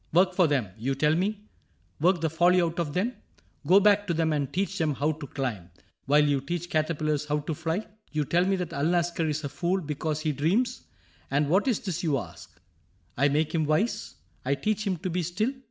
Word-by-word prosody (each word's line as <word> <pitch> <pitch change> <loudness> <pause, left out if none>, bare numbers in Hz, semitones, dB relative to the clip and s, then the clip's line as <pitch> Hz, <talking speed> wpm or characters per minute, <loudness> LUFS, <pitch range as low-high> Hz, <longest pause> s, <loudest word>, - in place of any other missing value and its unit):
" - - -37
Work 185 +2 +4
for 180 -2 +4
them. 135 -9 0
You 135 +4 -1
tell 150 +3 +2
me? 200 +5 -1 0.6
Work 175 +2 +3
the 160 - +1
folly 175 +3 +4
out 170 -1 0
of 150 -4 -2
them? 215 +8 0 0.5
Go 190 +2 +7
back 205 0 +4
to 170 - 0
them 160 -1 +1
and 145 -2 -1
teach 195 +3 -2
them 155 -3 +1
how 145 +4 +1
to 155 -2 -7
climb. 115 -12 -4 0.4
While 150 +1 +5
you 140 -2 +1
teach 175 +5 -4
caterpillars 155 -2 0
how 150 0 0
to 155 +2 -3
fly? 165 +6 -2 0.3
You 150 -1 0
tell 175 +5 +2
me 195 +1 +2
that 180 -3 -4
Alnaschar 170 +2 +1
is 155 +1 -2
a 145 - -3
fool 180 +6 0
Because 155 -1 -3
he 155 - 0
dreams? 195 - 0 0.4
And 145 +2 +1
what 190 - +3
is 240 -6 +2
this 180 -4 -3
you 155 -6 +1
ask? 85 -8 -9 0.6
I 140 +3 +3
make 150 +2 0
him 160 -2 +1
wise? 155 - 0 0.3
I 140 +2 +1
teach 215 +8 -1
him 185 -2 0
to 185 +3 -4
be 180 +2 0
still 185 +9 -1
160 Hz, 220 wpm, -27 LUFS, 145-180 Hz, 0.6 s, Go